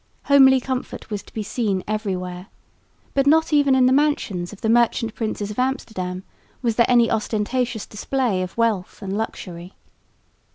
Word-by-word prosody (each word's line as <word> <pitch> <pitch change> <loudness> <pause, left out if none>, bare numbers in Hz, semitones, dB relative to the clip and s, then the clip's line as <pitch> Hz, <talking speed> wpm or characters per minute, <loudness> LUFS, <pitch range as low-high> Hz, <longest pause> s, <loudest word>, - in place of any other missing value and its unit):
Homely 265 -2 +6
comfort 255 -3 -5
was 205 -1 -3
to - - -19
be 220 - -4
seen 205 -3 -1
everywhere, 185 -4 -3 0.7
but 275 0 +2
not 320 +2 +4
even 285 -2 +4
in 260 -1 +4
the 255 - +4
mansions 265 -11 0
of 210 - -12
the - - -1
merchant 230 -1 +2
princes 215 -2 -3
of 210 - -6
Amsterdam 205 -8 -2 0.4
was 230 -2 +1
there 235 - +4
any 240 -2 +4
ostentatious 220 +2 -1
display 225 -2 -1
of 185 +3 -6
wealth 220 -6 -1
and 195 0 -3
luxury. 180 -4 -5
225 Hz, 160 wpm, -22 LUFS, 195-260 Hz, 0.7 s, Homely